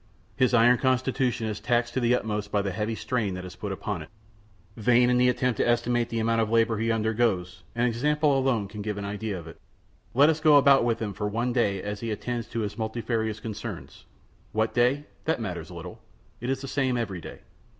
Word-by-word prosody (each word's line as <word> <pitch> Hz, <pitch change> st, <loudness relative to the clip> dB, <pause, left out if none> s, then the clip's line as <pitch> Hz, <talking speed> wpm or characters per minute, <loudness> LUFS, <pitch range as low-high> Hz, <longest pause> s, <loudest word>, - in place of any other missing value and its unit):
His 130 Hz, -, +3 dB
iron 120 Hz, +1 st, +5 dB
constitution 130 Hz, -2 st, +1 dB
is 105 Hz, -1 st, -3 dB
taxed 120 Hz, 0 st, 0 dB
to -, -, 0 dB
the 120 Hz, 0 st, +3 dB
utmost 105 Hz, -3 st, -3 dB
by 100 Hz, -1 st, +1 dB
the 100 Hz, -, -2 dB
heavy 105 Hz, +4 st, -2 dB
strain 110 Hz, -6 st, -2 dB
that 90 Hz, 0 st, -6 dB
is 90 Hz, -, -9 dB
put -, -, -5 dB
upon -, -, -4 dB
it. -, -, -10 dB, 0.7 s
Vain 125 Hz, +2 st, +4 dB
the 125 Hz, 0 st, +5 dB
attempt 125 Hz, -2 st, 0 dB
to -, -, +1 dB
estimate 120 Hz, 0 st, +1 dB
the 115 Hz, -, -3 dB
amount 115 Hz, 0 st, +2 dB
of 110 Hz, -, 0 dB
labor 115 Hz, -1 st, +2 dB
he 115 Hz, +1 st, +1 dB
undergoes; 110 Hz, -5 st, 0 dB
an 120 Hz, +1 st, +2 dB
example 145 Hz, +5 st, +2 dB
alone 130 Hz, -6 st, +1 dB
can 105 Hz, +1 st, -8 dB
give 105 Hz, 0 st, -3 dB
an 100 Hz, -, -4 dB
idea 105 Hz, 0 st, -3 dB
of 85 Hz, -, -9 dB
it. 80 Hz, -, -12 dB, 0.5 s
Let 140 Hz, +3 st, +7 dB
us 160 Hz, -1 st, +1 dB
then 155 Hz, -1 st, +5 dB
go -, -, +9 dB
about 140 Hz, -1 st, +6 dB
with 120 Hz, -1 st, 0 dB
him 105 Hz, -3 st, -3 dB
for 105 Hz, +2 st, -3 dB
one 120 Hz, +4 st, -1 dB
day 100 Hz, -6 st, +1 dB
as 105 Hz, 0 st, -4 dB
he 115 Hz, -, -4 dB
attends 115 Hz, +2 st, -3 dB
to 115 Hz, -, -3 dB
his 105 Hz, +1 st, -4 dB
multifarious 110 Hz, -1 st, -2 dB
concernments. 110 Hz, -2 st, -7 dB, 0.5 s
What 110 Hz, +1 st, 0 dB
day? 125 Hz, +4 st, +2 dB, 0.2 s
That 160 Hz, -3 st, +1 dB
matters 90 Hz, -7 st, -5 dB
little; 85 Hz, -2 st, -9 dB, 0.4 s
it 120 Hz, -, -4 dB
is 135 Hz, 0 st, -1 dB
the 135 Hz, -, -6 dB
same 130 Hz, -2 st, 0 dB
every 100 Hz, -7 st, -3 dB
day. -, -, -10 dB
115 Hz, 220 wpm, -27 LUFS, 105-125 Hz, 0.7 s, go